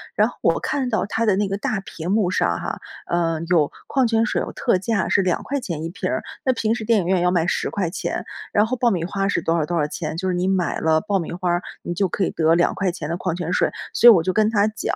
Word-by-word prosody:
然 - - +4
后 - - -14
我 - - +2
看 265 -3 -1
到 220 - 0
它 225 +3 -1
的 210 -3 +3
那 205 +1 0
个 195 - -1
大 220 -2 -2
屏 170 -3 -7
幕 200 -3 +2
上 - - +1
哈， - - -4 0.3
呃， 165 -2 0
有 160 -5 +3 0.2
矿 265 -3 +2
泉 225 0 +2
水， - - -1
有 - - -5
特 235 - +1
价 220 +4 -1
是 200 - +3
2 185 -2 0
块 280 +1 -2
钱 170 - -5
一 165 - -3
瓶 175 - -4
儿， - - -2 0.2
那 260 - +3
平 225 -2 0
时 230 -2 -4
电 225 -2 +3
影 170 - -4
院 185 0 +2
要 180 - +3
卖 175 -2 +1
10 - - -1
块 190 -5 -2
钱， 175 - -3 0.3
然 210 - +4
后 255 +3 -2
爆 240 0 +3
米 180 -7 -1
花 195 +3 -2
儿 195 - +1
是 - - 0
多 165 +1 +1
少 155 - +1
多 175 - -3
少 150 - +2
钱， 155 +1 -5
就 185 +3 -2
是 - - 0
你 180 +1 0
买 190 -2 0
了 160 0 +2
爆 205 -2 0
米 170 - -5
花 180 0 -2
儿， 175 0 +1 0.2
你 175 - -4
就 190 +3 +1
可 190 - -2
以 - - +1
得 160 0 +3
2 175 - +2
块 195 -2 0
钱 165 -4 -6
的 170 - -2
矿 180 -2 -2
泉 175 -1 -3
水。 180 - +2 0.2
所 240 - +8
以 - - +10
我 170 -5 +3
就 185 - 0
跟 215 +3 +2
他 205 -2 +3
讲， 215 - -3
185 Hz, 310 characters per minute, -22 LUFS, 170-215 Hz, 0.3 s, 以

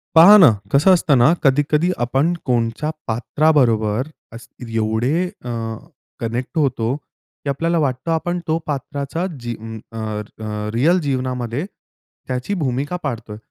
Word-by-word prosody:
पहा 175 +6 +10
ना. 175 - +8 0.2
कसं 150 +7 +6
असतं 145 -4 +3
ना? 120 - +6 0.2
कधी-कधी 145 +4 +3 0.2
आपण 135 +7 +1
कोणत्या 120 +4 0 0.2
पात्राबरोबर 120 -2 +2 0.3
अस्त्री 115 0 -10
एवढे 115 +11 +1 0.2
अ, - - -4 0.7
कनेक्ट 120 +7 -4
होतो 130 -5 +1
की 140 0 -11
आपल्याला 165 +5 0
वाटतं 135 +2 -1
आपण 175 +2 -1
त्या 160 0 +2
पात्राची 140 +3 -3 0.2
जी 120 0 -4 0.4
अ, 115 - -8
अ, 105 0 -5
रिअल 160 +10 +3
जीवनामध्ये 130 0 -2 0.6
त्याची 130 +9 -2
भूमिका 145 -2 -1
पाडतोय. 115 -6 -4
130 Hz, 125 wpm, -20 LUFS, 115-155 Hz, 0.7 s, पहा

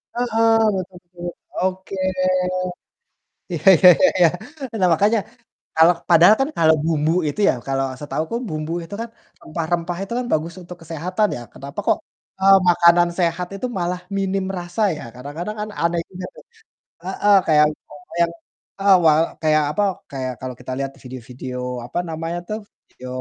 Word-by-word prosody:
Heeh, 225 -2 +2 0.2
betul 185 -1 -5
betul 175 0 -9 0.3
oke. 190 +1 -2 1.6
Iya 165 0 -5
iya 180 +3 +7
iya 280 - +5
iya. 175 -2 +6 0.5
Nah, 180 - +4
makanya 210 +7 +3 0.6
kalau 165 +2 +7 0.2
padahal 175 +5 +7
kan 270 - +1
kalau 160 -1 +5
bumbu 155 -1 +1 0.2
itu 145 - -4
ya, - - +3
kalau 135 0 0
setahuku 155 +7 -3
bumbu 155 +1 -4
itu 185 +5 -8
kan 230 - -5 0.3
rempah-rempah 170 +2 -3
itu 195 - -6
kan 250 - -3
bagus 160 +2 -1
untuk 175 0 -10
kesehatan 170 +6 -1
ya, - - -8
kenapa 140 +1 -8
kok, - - +4 0.4
eee, 195 +1 +7
makanan 175 0 +5
sehat 175 0 0
itu 225 +6 -3
malah 180 +1 -2 0.2
minim 195 0 -1
rasa 175 +4 -5 0.2
ya - - -8
kadang-kadang 150 +11 -6
kan 210 - -4
aneh 170 0 +1
juga 185 0 -7
tuh - - -14 0.6
heeh 200 +2 +3
kayak 150 -1 +5
umpama 145 -1 -16
yang 170 0 +2 0.5
heeh 195 -1 +6
wal 155 0 +6 0.2
kayak 155 -1 +3
apa 205 - -1 0.3
kayak 130 -2 -3
kalau 130 -1 -5
kita 130 - -7
lihat 135 0 -3
video-video 125 0 -8 0.3
apa 125 - -6
namanya 165 +2 -4
tuh 215 - -3 0.3
video 130 - -11
170 Hz, 160 wpm, -21 LUFS, 155-190 Hz, 1.6 s, iya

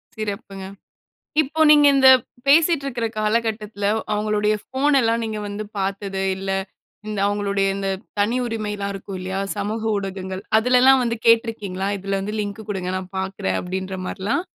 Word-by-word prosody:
சிறப்புங்க. 200 -3 -5 0.8
இப்போ 310 +2 -5
நீங்க 295 -1 +7
இந்த 265 -1 +7 0.4
பேசிட்டு 310 +1 +4
இருக்கிற 240 -4 -2
காலகட்டத்தில 215 -1 -1 0.3
அவுங்களுடைய 210 0 +1
ஃபோன் 275 +3 +1
எல்லாம் 230 -1 +1
நீங்க 220 -1 -4
வந்து 205 +1 -5
பார்த்தது 195 0 -2
இல்ல. 195 0 -4 0.6
இந்த 210 -2 -3
அவுங்களுடைய 200 -1 0
இந்த 195 0 -2 0.3
தனி 220 +5 +2
உரிமைலாம் 210 -3 -3
இருக்கும் 195 0 -7
இல்லயா! 190 +1 -3 0.2
சமூக 210 +2 -3
ஊடகங்கள், 190 -1 -5 0.2
அதுலலாம் 250 +3 +5
வந்து 230 -1 -1
கேட்டிருக்கீங்களா! 225 -5 +2
இதில 195 0 -2
வந்து 210 +2 -4
லிங்க் 205 +1 -5
கொடுங்க 185 -3 -2
நான் 185 0 -8
பார்க்கிறேன். 190 - -2
அப்பிடின்ற 190 +1 -4
மாரிலாம். 205 - -2
205 Hz, 140 wpm, -22 LUFS, 195-230 Hz, 0.8 s, நீங்க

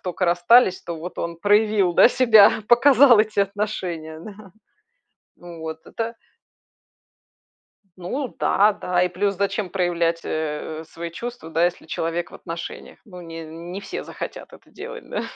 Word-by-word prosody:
тока 180 0 -3
расстались, 180 +4 +4
то 170 - -6
вот 170 +3 -8
он 170 0 -4
проявил, 205 -1 +2
да, - - +7
себя, 220 -5 +6 0.2
показал 250 -1 +6
эти 215 -1 0
отношения, 185 -6 -3
да. 200 +1 -12 0.9
Ну, 175 -1 -11
вот 160 0 -7
это 230 0 -5 1.8
Ну 245 +9 -5
да, 210 +2 +3
да. 180 -3 -1
И 180 - +2
плюс, 195 +2 -1
зачем 200 0 -1
проявлять, 170 -3 0
э, 155 0 -4
свои 170 0 -7
чувства 235 -3 -8
да, 165 +2 +2
если 175 -2 -2
человек 165 +1 -3
в - - -14
отношениях? 170 -1 -8
Ну, 180 -5 -12
не 165 -1 -8
не 170 +4 -8
все 200 - -6
захотят - - -8
это - - -17
делать, - - -9
да. - - -3
180 Hz, 150 wpm, -22 LUFS, 170-210 Hz, 1.8 s, да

